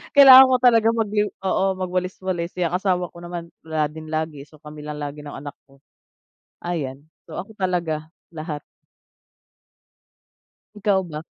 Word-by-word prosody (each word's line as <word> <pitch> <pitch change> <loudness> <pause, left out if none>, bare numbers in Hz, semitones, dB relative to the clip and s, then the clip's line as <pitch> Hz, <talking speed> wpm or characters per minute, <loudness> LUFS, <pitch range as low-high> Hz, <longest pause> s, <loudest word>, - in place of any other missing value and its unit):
Kailangan 265 -2 +10
ko 255 - +5
talaga 230 -3 +5
mag-yu 210 -2 0
oo, 190 0 +1 0.2
magwalis-walis. 185 -1 -3
Eh, 175 - +2
ang 175 - -2
asawa 180 -1 0
ko - - -14
naman 175 -1 -6 0.2
wala 155 -2 -1
din 155 +1 -10
lagi, 155 -3 -3
so, 150 0 -19
kami 150 0 -11
lang 150 0 -6
lagi 145 0 -6
ng 145 - -8
anak 145 +1 -8
ko. 135 0 -22 0.8
Ayan. 145 -6 -4 0.2
So, - - -9
ako 195 +4 -6
talaga. 170 -4 -1 0.2
Lahat. 155 -2 -6 2.2
Ikaw 195 -2 +3
ba? 155 -2 -7
170 Hz, 150 wpm, -22 LUFS, 150-190 Hz, 2.2 s, Kailangan